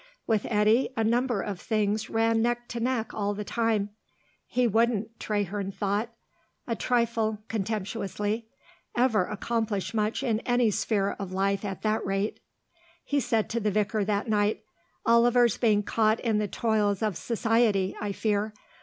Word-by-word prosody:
With 220 -3 +1
Eddy 215 +3 +3
a 225 - +2
number 235 -1 +1
of 200 -4 -4
things 215 0 0
ran 225 0 +2
neck 240 +1 0
to 240 - -4
neck 235 -2 -1
all 205 -1 -1
the 210 - -4
time. 220 -2 0 0.6
He 250 0 +2
wouldn't, 225 0 +1
Traherne 205 -1 -2
thought, 205 +3 -1 0.6
a 230 - -1
trifle 230 -3 +1
contemptuously, 210 +1 -2 0.5
ever 240 -6 +3
accomplish 215 -1 -2
much 215 +3 0
in 225 -5 +1
any 245 -2 +2
sphere 200 -1 0
of 190 -2 -5
life 195 +1 0
at 195 -2 -5
that 215 0 +1
rate. 195 +2 -1 0.6
He 285 - 0
said 225 -4 +1
to 235 - 0
the 210 -1 0
vicar 210 +1 0
that 205 +3 -1
night, 210 0 +1 0.4
"Oliver's 235 0 +4
being 210 -3 +3
caught 220 +1 +2
in 220 -3 +1
the 210 - 0
toils 210 -1 0
of 210 -4 0
Society, 225 -4 +1
I 205 -1 -2
fear. 210 +1 -1
215 Hz, 155 wpm, -27 LUFS, 205-230 Hz, 0.6 s, Oliver's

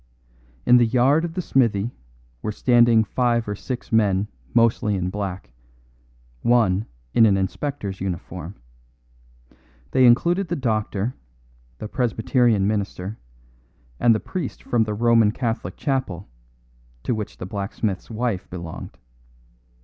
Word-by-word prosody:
In 125 0 +7
the 120 - +5
yard 130 +7 +3
of 170 -1 -4
the 180 - -2
smithy 115 -6 +1 0.5
were 105 - -2
standing 120 0 +4
five 120 0 0
or 105 - -2
six 125 +4 -6
men 105 -3 +2 0.2
mostly 115 -1 +2
in 90 -1 -2
black, 95 -10 -5 0.9
one 110 -4 +2 0.3
in 115 - +6
an 100 -2 +3
inspector's 100 0 -3
uniform. 90 -1 -5 1.4
They 130 -1 +5
included 175 +10 +3
the 175 - -1
doctor, 110 - -1 0.6
the 110 - -6
Presbyterian 120 -2 +1
minister, 100 -1 -2 0.8
and 115 -2 +5
the - - 0
priest 185 - -5
from 115 -2 +1
the 105 -1 -3
Roman 115 -1 +4
Catholic 115 -6 -3
chapel, 130 - -2 0.8
to - - 0
which 110 -2 -5
the - - -6
blacksmith's 100 0 -3
wife 115 -4 -2
belonged. 85 -3 -8
110 Hz, 125 wpm, -23 LUFS, 100-125 Hz, 1.4 s, In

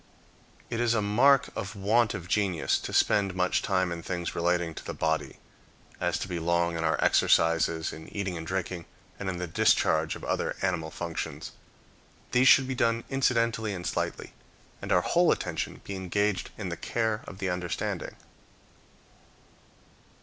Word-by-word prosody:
It 115 - -1
is 120 -1 +2
a 110 - +2
mark 125 +7 +4
of 100 +2 -5
want 110 +3 +2
of 90 -2 -7
genius 95 -3 +1
to - - -6
spend 100 -3 +2
much 90 0 +1
time 95 -2 0
in 85 -1 -4
things 85 -1 -3
relating 85 -1 0
to - - -9
the - - -6
body, 80 -1 -1 0.6
as 85 -2 0
to 90 - -4
be 90 -2 -3
long 85 0 +1
in 80 - -2
our 80 -1 +2
exercises, 80 0 +3
in 80 - -10
eating 95 -3 -3
and 80 -1 -6
drinking, 90 -1 -3 0.3
and 100 - -3
in 90 - -3
the 90 - -3
discharge 80 -4 +2
of - - -10
other - - -1
animal 85 -4 0
functions. 85 0 -5 0.8
These 125 +2 +4
should 135 -1 +7
be 130 - -2
done 115 -2 +1
incidentally 115 -5 +1
and 90 -1 -6
slightly, - - -3 0.5
and - - -5
our - - +5
whole - - +3
attention - - -3
be 100 - -6
engaged 95 0 -1
in - - -4
the - - -4
care 110 -2 -1
of 95 - -9
the 95 -2 -2
understanding. 90 -1 -3
95 Hz, 165 wpm, -28 LUFS, 85-105 Hz, 0.8 s, should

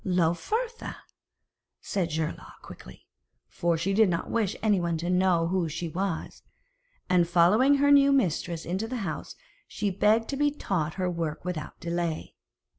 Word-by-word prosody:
'Lauphertha,' 190 - -1 0.8
said 185 -4 -2
Geirlaug 160 0 -4
quickly, - - -13 0.4
for 170 -1 0
she 185 +5 -1
did 215 0 +4
not 170 -1 -2
wish 220 -4 0
anyone 175 -6 +1
to 175 +3 -2
know 180 -2 +2
who 180 -3 0
she 165 +2 -4
was; 175 +1 -4 0.7
and 175 -2 +3
following 205 +11 +5
her 285 +1 +3
new 280 0 +6
mistress 175 - 0
into 190 +6 -2
the 255 +2 -4
house, 155 - -5 0.3
she 205 -1 -2
begged 215 +4 +2
to 275 - -2
be 290 +1 +3
taught 180 - -2
her 185 -1 -1
work 165 -2 -3
without 175 -4 -5
delay. 170 -1 -3
180 Hz, 150 wpm, -27 LUFS, 170-220 Hz, 0.8 s, new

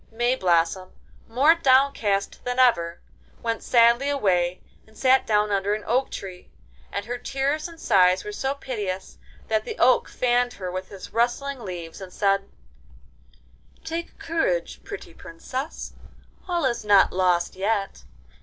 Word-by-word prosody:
Mayblossom, 185 -7 +1 0.3
more 270 +8 +5
downcast 260 -10 +2
than 245 0 -3
ever, 175 -10 +3 0.4
went 230 -1 -1
sadly 235 +3 +4
away 185 -10 +1 0.3
and 220 0 -20
sat 260 0 +3
down 210 -1 +2
under 200 +1 +1
an 215 - -7
oak 255 +4 +1
tree, 185 -2 -8 0.4
and 200 0 -4
her 245 +1 -4
tears 275 +5 -1
and 335 -1 -13
sighs 185 - +3
were 420 - -6
so 275 -9 -2
piteous 205 -9 -5 0.3
that 220 -1 +1
the - - -6
oak 255 +1 +4
fanned 245 0 +1
her 185 -2 -6
with 185 +1 -5
his 195 -2 -10
rustling 245 +4 0
leaves, 175 -5 -7
and 190 -1 -9
said: 195 +1 0 1.3
'Take 335 +1 -5
courage, - - -2
pretty 400 -4 -9
Princess, 260 - -7 0.5
all 345 -4 0
is 240 -3 -1
not 205 -2 +5
lost 180 -2 +1
yet. 200 +1 -2
230 Hz, 140 wpm, -24 LUFS, 190-265 Hz, 1.3 s, more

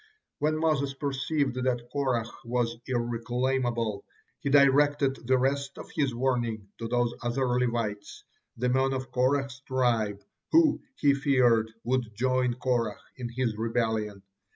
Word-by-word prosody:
When 155 +1 +1
Moses 145 -4 +1
perceived 140 0 -1
that 120 -2 -1
Korah 130 -5 0 0.2
was 120 -1 -1
irreclaimable, 120 -2 -1 0.4
he - - -2
directed 140 -2 +4
the 130 0 +4
rest 140 +1 -1
of - - -9
his 135 -5 +1
warning 120 -5 -1
to 115 - -3
those 120 0 +1
other 120 +2 0
Levites, 120 -4 -1 0.3
the 125 +2 0
men 130 +1 +2
of 130 -1 -4
Korah's 130 +1 +1
tribe, 120 -7 0 0.3
who, 320 -2 +5
he 145 -2 +3
feared, 125 -5 +3
would 120 -3 -1
join 130 +1 +1
Korah 120 -4 0 0.2
in 125 -2 -4
his 120 -2 -1
rebellion. 110 -3 -1
125 Hz, 130 wpm, -28 LUFS, 115-135 Hz, 0.4 s, who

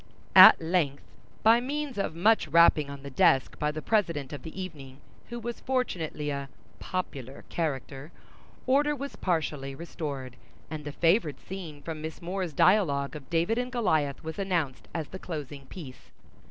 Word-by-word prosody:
At - - +11
length, 160 -4 0 0.4
by 225 +2 +6
means 285 -2 -3
of 180 -5 -2
much 210 +2 +3
rapping 155 -2 +5
on 140 -1 -8
the 140 - -7
desk 130 0 +3
by 150 - +1
the 155 +1 -5
president 170 -11 0
of 145 - -6
the 160 +3 -9
evening, 145 -8 -8 0.3
who 240 0 -5
was 235 0 -5
fortunately 170 - -2
a 140 -1 -4 0.3
"popular" 140 -8 -5
character, 145 -2 -3 0.5
order 290 +3 +3
was 280 0 -6
partially 150 -6 -2
restored; 140 -6 -6 0.3
and 155 -1 -6
the 150 - -4
favorite 165 - +2
scene 170 -6 -8
from 160 -2 -5
Miss 160 +1 -6
More's 180 0 -3
dialogue 145 -6 +3
of 145 -3 -10
David 170 +8 +1
and 250 0 -3
Goliath 160 - 0
was 160 +4 -6
announced 175 -9 -1
as 160 -3 -4
the 190 - -8
closing 145 -6 -7
piece. 130 -8 -11
160 Hz, 160 wpm, -28 LUFS, 140-190 Hz, 0.5 s, At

